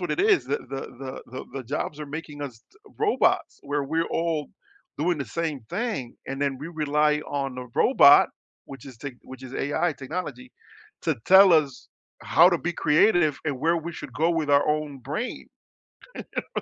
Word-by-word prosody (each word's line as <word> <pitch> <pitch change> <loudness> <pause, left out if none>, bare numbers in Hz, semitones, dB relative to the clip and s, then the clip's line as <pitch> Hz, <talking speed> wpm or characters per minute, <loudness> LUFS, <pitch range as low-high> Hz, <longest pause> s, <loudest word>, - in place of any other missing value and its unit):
what 175 - -3
it - - 0
is. 410 -3 +4
The - - -1
the 135 0 -7
the 130 +1 -7
the 135 -1 -5
jobs 150 +3 -4
are 150 - -5
making 145 0 -7
us 120 -5 -8
to 420 - -24 0.2
robots 425 -1 +1
where 145 0 -2
we're 160 +4 -1
all 165 -3 -1 0.5
doing 170 +2 +1
the 140 - -2
same 160 -4 -3
thing. 175 - -3
And 135 +1 -5
then 140 -2 0
we 150 +4 -7
rely 150 -2 +1
on 135 -2 -3
the 125 0 -6
robot, - - +6 0.4
which 135 0 -11
is 130 -3 -11
tec 135 +3 -7
which 130 0 -12
is 130 0 -9
AI 155 +4 0
technology 135 -4 -6 0.5
to - - 0
tell 190 0 +8
us 145 -5 +1 0.3
how 170 +2 +6
to 180 - +2
be 175 - -2
creative 155 -1 +3
and 145 -4 -2
where 165 +5 +2
we 170 +1 -5
should 140 - -9
go 160 +6 +1
with 165 -3 -1
our 140 0 +4
own 150 -2 -1
brain. 150 - -5 1.1
You - - 0
150 Hz, 185 wpm, -25 LUFS, 135-170 Hz, 1.1 s, tell